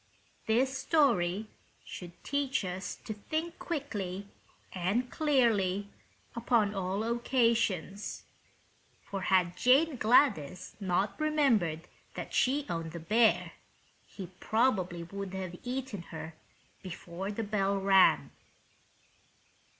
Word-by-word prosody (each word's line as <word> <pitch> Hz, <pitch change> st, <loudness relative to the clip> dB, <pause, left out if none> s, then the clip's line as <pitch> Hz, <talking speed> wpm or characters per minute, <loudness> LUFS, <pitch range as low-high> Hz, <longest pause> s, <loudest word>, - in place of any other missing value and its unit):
This 260 Hz, +4 st, +2 dB
story 220 Hz, -, +2 dB, 0.4 s
should 175 Hz, -1 st, -10 dB
teach 280 Hz, -6 st, 0 dB
us 185 Hz, +1 st, -4 dB
to 215 Hz, -, -3 dB
think 315 Hz, -, -4 dB
quickly 200 Hz, -, -4 dB, 0.5 s
and 200 Hz, +8 st, -1 dB
clearly 215 Hz, -10 st, +2 dB, 0.5 s
upon 230 Hz, -3 st, +2 dB
all 195 Hz, +1 st, -2 dB
occasions; 230 Hz, -5 st, 0 dB, 0.8 s
for 195 Hz, -1 st, -5 dB
had 180 Hz, -2 st, +2 dB
Jane 275 Hz, +3 st, +4 dB
Gladys 185 Hz, -, +2 dB
not 195 Hz, -, 0 dB
remembered 235 Hz, -, +2 dB, 0.3 s
that -, -, -6 dB
she 280 Hz, +3 st, +2 dB
owned 165 Hz, -1 st, -4 dB
the 170 Hz, -, -5 dB
bear 220 Hz, +8 st, +3 dB, 0.6 s
he 185 Hz, -3 st, -9 dB
probably 190 Hz, -7 st, +1 dB
would 195 Hz, +2 st, -6 dB
have 185 Hz, -2 st, -5 dB
eaten 250 Hz, -5 st, -4 dB
her 160 Hz, 0 st, -7 dB, 0.5 s
before 180 Hz, +1 st, -6 dB
the 225 Hz, +2 st, -3 dB
bell 200 Hz, -1 st, 0 dB
rang. 195 Hz, -1 st, +4 dB
205 Hz, 105 wpm, -31 LUFS, 185-250 Hz, 0.8 s, Jane